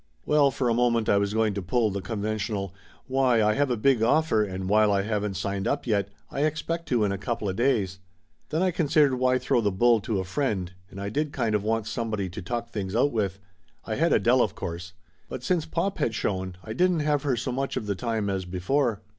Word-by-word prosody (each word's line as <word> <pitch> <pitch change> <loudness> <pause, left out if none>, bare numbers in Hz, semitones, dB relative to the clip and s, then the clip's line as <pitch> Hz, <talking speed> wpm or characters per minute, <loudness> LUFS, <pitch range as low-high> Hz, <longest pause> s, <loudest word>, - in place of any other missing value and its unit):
Well, 145 -2 +4
for 130 -1 -1
a 115 - +3
moment 115 -2 +2
I 100 - +4
was 100 +1 -1
going 110 -2 +2
to 100 - -3
pull 110 +3 +1
the 100 0 -3
conven 110 +2 -3
tional 100 -3 -3 0.3
"Why, 130 -4 +2
I 105 0 +3
have 140 +2 +1
a 120 - 0
big 125 +1 +3
offer 115 -2 +3
and 95 -2 -4
while 105 +1 +4
I 100 -1 +2
haven't 105 -2 -2
signed 100 0 -2
up - - -1
yet, 100 -4 0 0.2
I 140 - -2
expect 155 +2 -1
to 120 -4 +2
in 100 - +1
a 100 - -3
coupla 110 -4 -2
days." 105 -6 +1 0.5
Then 160 +4 0
I 185 - +2
considered 150 -4 +3
why 130 0 +3
throw 125 -1 +1
the 105 -2 +1
bull 115 +4 +4
to 105 0 -2
a 95 - -1
friend, 95 -4 -2 0.2
and 95 - -10
I 100 0 -3
did 150 +6 -1
kind 115 -6 -1
of 105 - +2
want 110 0 0
somebody 110 -4 -2
to 90 +4 -7
talk 120 +5 -4
things 100 -2 -4
out 135 +5 +3
with. 100 -4 -1 0.5
I 110 - -3
had 165 +9 +2
Adele 120 +5 +4
of 105 -3 0
course. 85 +1 -6 0.4
But 125 - -6
since 165 +1 0
pop 185 +5 -2
had 115 - 0
shown, 95 -3 -2
I 110 - -6
didn't 180 +4 +2
have 150 -1 +1
her 135 -5 0
so 125 +2 -2
much 135 +2 -2
of - - -3
the 100 - 0
time 110 0 -2
as 95 -2 -2
before. 105 +6 0
110 Hz, 235 wpm, -26 LUFS, 100-130 Hz, 0.5 s, Well